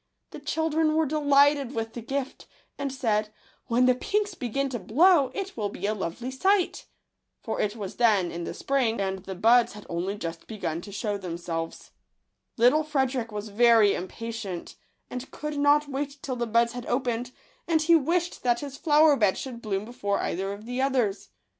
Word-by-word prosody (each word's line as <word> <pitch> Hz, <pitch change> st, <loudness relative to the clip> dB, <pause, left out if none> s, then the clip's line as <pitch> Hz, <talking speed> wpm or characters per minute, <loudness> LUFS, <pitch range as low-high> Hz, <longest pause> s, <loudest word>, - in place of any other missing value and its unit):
The -, -, -8 dB
children 315 Hz, +1 st, 0 dB
were 320 Hz, 0 st, +3 dB
delighted 285 Hz, -2 st, +3 dB
with 225 Hz, 0 st, -3 dB
the 240 Hz, -, -6 dB
gift, 270 Hz, +3 st, -4 dB, 0.3 s
and 280 Hz, -1 st, -3 dB
said, 220 Hz, -5 st, 0 dB, 0.2 s
" -, -, -35 dB
When 240 Hz, +2 st, +3 dB
the 255 Hz, -, +5 dB
pinks 410 Hz, +9 st, -1 dB
begin 275 Hz, -1 st, -2 dB
to 245 Hz, -2 st, -4 dB
blow, 280 Hz, -, +4 dB
it 390 Hz, -1 st, -4 dB
will 210 Hz, -3 st, -2 dB
be 200 Hz, -, -6 dB
a 210 Hz, -, +1 dB
lovely 210 Hz, +6 st, -4 dB
sight 380 Hz, +7 st, +1 dB, 0.3 s
!" -, -, -55 dB
for -, -, -2 dB
it 205 Hz, +1 st, -1 dB
was 200 Hz, -4 st, -6 dB
then 210 Hz, -7 st, +3 dB
in 170 Hz, 0 st, -5 dB
the -, -, -5 dB
spring, 250 Hz, -5 st, 0 dB
and 190 Hz, -1 st, -1 dB
the 190 Hz, 0 st, -7 dB
buds 235 Hz, +5 st, +4 dB
had 210 Hz, 0 st, -11 dB
only 180 Hz, +4 st, -2 dB
just 165 Hz, -3 st, -6 dB
begun 170 Hz, -7 st, -4 dB
to 200 Hz, -, -10 dB
shew 205 Hz, 0 st, -2 dB
themselves. 170 Hz, -2 st, -5 dB, 0.7 s
Little 250 Hz, +7 st, +5 dB
Frederick 265 Hz, -6 st, -1 dB
was 210 Hz, +1 st, -5 dB
very 225 Hz, -1 st, +5 dB
impatient, 205 Hz, -1 st, -6 dB, 0.3 s
and 250 Hz, +1 st, -7 dB
could 300 Hz, -1 st, -5 dB
not 290 Hz, +1 st, +4 dB
wait 280 Hz, +1 st, -4 dB
till 260 Hz, -, -3 dB
the 240 Hz, -1 st, -2 dB
buds 230 Hz, +1 st, +2 dB
had 245 Hz, -1 st, -7 dB
opened; 245 Hz, -1 st, -1 dB, 0.4 s
and 320 Hz, -2 st, +2 dB
he 335 Hz, +1 st, +6 dB
wished 340 Hz, +3 st, 0 dB
that 240 Hz, -1 st, +1 dB
his 280 Hz, -1 st, -7 dB
flower 300 Hz, 0 st, +5 dB
bed 210 Hz, -6 st, +2 dB
should 245 Hz, -3 st, -6 dB
bloom 200 Hz, -2 st, -2 dB
before 205 Hz, -4 st, -2 dB
either 195 Hz, +3 st, -2 dB
of 205 Hz, +2 st, -8 dB
the 245 Hz, +2 st, -2 dB
others. 250 Hz, -7 st, 0 dB
240 Hz, 190 wpm, -27 LUFS, 210-285 Hz, 0.7 s, he